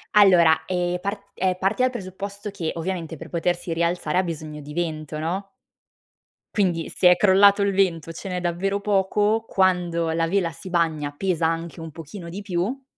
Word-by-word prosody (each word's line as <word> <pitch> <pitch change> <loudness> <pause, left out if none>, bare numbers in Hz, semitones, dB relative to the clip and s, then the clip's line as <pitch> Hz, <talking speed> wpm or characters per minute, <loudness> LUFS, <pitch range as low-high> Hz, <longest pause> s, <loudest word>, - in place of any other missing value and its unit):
Allora, 180 -6 +6
ehm, 180 -1 -1
part 200 +2 -3
ehm, 185 -1 +1
parti 195 +6 +1
dal 255 0 +3
presupposto 200 -1 -6
che 180 -5 -3
ovviamente 165 -2 -4
per 165 +2 -10
potersi 175 0 -1
rialzare 170 0 0
ha 185 - +4
bisogno 155 -3 -6
di 150 +1 -9
vento, 155 -2 -3
no? 190 +5 -3 1.0
Quindi 175 -5 0
se 180 - +4
è - - +6
crollato 200 +1 +6
il 200 0 +2
vento 175 -5 +1
o - - -6
ce 190 - -7
n'è 180 -1 -2
davvero 185 +3 -1
poco, 205 +2 +1
quando 175 -3 +1
la 165 0 +1
vela 175 -2 +1
si 185 +6 -10
bagna 160 -4 0
pesa 180 -2 0
anche 165 0 -3
un 160 -1 -7
pochino 170 +3 -9
di 190 +4 -6
più 200 +8 -2
180 Hz, 180 wpm, -24 LUFS, 165-195 Hz, 1.0 s, Allora